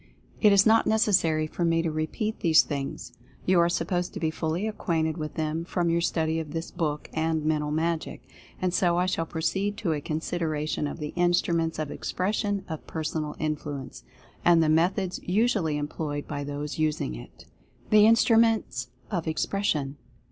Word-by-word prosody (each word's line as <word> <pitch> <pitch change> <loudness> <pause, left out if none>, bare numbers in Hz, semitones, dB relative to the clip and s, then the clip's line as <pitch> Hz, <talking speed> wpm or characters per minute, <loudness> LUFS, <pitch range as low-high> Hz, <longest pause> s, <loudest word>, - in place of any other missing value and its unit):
It 210 - +6
is 200 0 +6
not 225 0 +5
necessary 185 -8 +3
for 165 +3 -4
me 165 -1 +2
to 165 - -1
repeat 155 +8 -2
these 160 -3 +5
things 140 -2 -5 0.2
— - - -28
you 185 -1 +4
are 170 0 +4
supposed 175 0 -1
to - - -3
be 160 -1 0
fully 165 +6 -2
acquainted 160 -7 -1
with 155 -2 -5
them, 160 0 -2
from 170 -1 0
your 170 0 +2
study 160 -1 0
of 155 -2 -6
this 165 0 -4
book 150 -4 -2
and 160 -1 0
"Mental 150 -1 +1
Magic." 160 +2 -2 0.4
And 180 -1 0
so 175 -2 +2
I 180 - +2
shall 165 -3 -1
proceed 195 +6 -1
to 175 -7 0
a 150 - -3
consideration 155 -1 -2
of - - -6
the 150 -2 -5
Instruments 175 -2 +1
of 155 -2 -3
Expression 205 +1 -2
of 160 -1 -7
Personal 155 -1 -3
Influence, 150 -3 -4 0.4
and 170 -1 +5
the 155 - +2
methods 180 +4 +1
usually 190 -6 +1
employed 145 0 -4
by 145 -1 -4
those 145 +2 -5
using 155 - 0
it. - - -11 0.5
THE 215 0 +7
INSTRUMENTS 225 - +3 0.2
OF 170 -2 -2
EXPRESSION. 155 -4 -1
165 Hz, 170 wpm, -27 LUFS, 155-180 Hz, 0.5 s, THE